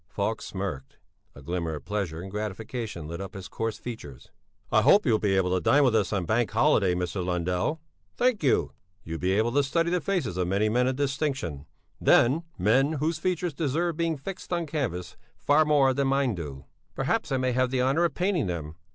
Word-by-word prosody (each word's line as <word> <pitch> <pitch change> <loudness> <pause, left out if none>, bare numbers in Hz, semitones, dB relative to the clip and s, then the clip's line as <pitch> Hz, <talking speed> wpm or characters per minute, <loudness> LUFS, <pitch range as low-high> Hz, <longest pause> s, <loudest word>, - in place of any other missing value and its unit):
Falk 105 +2 -2
smirked; 90 -9 -5 0.4
a 70 - -12
glimmer 85 0 -2
of 75 - -9
pleasure 95 -5 -3
and 95 - -8
gratification 105 -3 -5
lit 85 +3 -6
up 95 +1 -7
his 95 -1 -7
coarse 115 -1 -3
features. 75 - -9 0.4
"I - - +5
hope 205 - +5
you'll 115 -5 +3
be 95 -2 +1
able 90 -1 +1
to 95 - +1
dine 145 0 +4
with 125 -4 +3
us 105 -4 +1
on 100 -4 -1
bank 110 +4 +1
holiday, 105 -6 +3
Mr. 90 +1 -2
Lundell?" 90 - -1 0.4
"Thank 245 -3 +2
you...." 135 -5 +2 0.3
"You'll 80 0 -5
be 95 +1 +1
able 110 +4 +2
to 145 +3 +3
study 165 +5 0
the 180 -1 +1
faces 150 - -1
of 90 -1 0
many 100 +4 +1
men 125 +3 +2
of 130 - 0
distinction, 135 - -2 0.3
then, 135 +7 +4 0.2
men 130 - +3
whose 155 +2 -1
features 180 -1 -1
deserve 160 +4 -1
being 165 -1 0
fixed 180 +8 -8
on 170 -1 0
canvas 130 - -3 0.2
far 150 +2 +3
more 140 -3 +4
than 140 +1 0
mine 135 -2 +2
do." 75 -7 -7 0.3
"Perhaps - - -1
I 135 - +2
may 130 0 0
have 130 +1 +1
the 125 -1 +1
honour 140 +6 +2
of 170 - -2
painting 180 - 0
them?" 80 -2 -5
115 Hz, 205 wpm, -27 LUFS, 90-145 Hz, 0.4 s, I